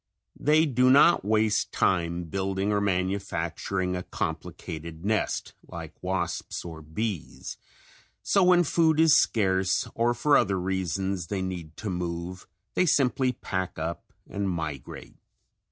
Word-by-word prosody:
They 155 Hz, +2 st, +4 dB
do 130 Hz, -3 st, +3 dB
not 145 Hz, -, +6 dB
waste 110 Hz, +1 st, +1 dB
time 85 Hz, -1 st, +1 dB
building 95 Hz, +3 st, -1 dB
or 100 Hz, -1 st, +1 dB
manufacturing 95 Hz, -1 st, -1 dB
a 90 Hz, -, -2 dB
complicated 80 Hz, -1 st, -5 dB
nest 110 Hz, +1 st, -1 dB
like -, -, -8 dB
wasps 90 Hz, -2 st, -3 dB
and 80 Hz, -2 st, -9 dB
bees, 105 Hz, -3 st, -4 dB, 0.7 s
so 195 Hz, -, +3 dB
when 180 Hz, -1 st, +6 dB
food 160 Hz, -1 st, +2 dB
is 160 Hz, -1 st, +6 dB
scare, 95 Hz, -4 st, +1 dB, 0.3 s
or 120 Hz, +1 st, +1 dB
for 145 Hz, +5 st, +3 dB
other 95 Hz, -1 st, +1 dB
reasons 95 Hz, 0 st, -2 dB
they 95 Hz, 0 st, -2 dB
need 85 Hz, -4 st, -6 dB
to 105 Hz, -3 st, -4 dB
move 90 Hz, +1 st, -4 dB, 0.3 s
they 180 Hz, -, +2 dB
simply 130 Hz, -3 st, +2 dB
"pack 95 Hz, -5 st, -4 dB
up" 80 Hz, +2 st, -5 dB, 0.2 s
and 100 Hz, -1 st, -2 dB
migrate. 80 Hz, -7 st, -5 dB
95 Hz, 130 wpm, -27 LUFS, 85-115 Hz, 0.7 s, not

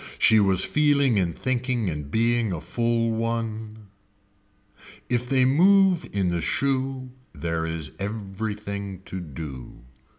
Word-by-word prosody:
She 110 Hz, -, +5 dB
was 95 Hz, -2 st, +3 dB
feeling 140 Hz, -5 st, +3 dB
in 85 Hz, -3 st, 0 dB
thinking 125 Hz, -2 st, -1 dB
in 75 Hz, -4 st, -3 dB
being 115 Hz, +2 st, +1 dB
a 85 Hz, -, -3 dB
full 115 Hz, +7 st, 0 dB
one. 110 Hz, -2 st, -3 dB, 1.2 s
If 125 Hz, 0 st, 0 dB
they 130 Hz, -2 st, +4 dB
move 185 Hz, +5 st, +4 dB
in 95 Hz, -3 st, 0 dB
the 85 Hz, -1 st, -1 dB
shoe 130 Hz, -, -1 dB, 0.2 s
there 80 Hz, -1 st, -2 dB
is 80 Hz, -2 st, -4 dB
everything 100 Hz, -1 st, -5 dB
to 95 Hz, -, -6 dB
do. 70 Hz, -7 st, -8 dB
110 Hz, 125 wpm, -25 LUFS, 95-125 Hz, 1.2 s, She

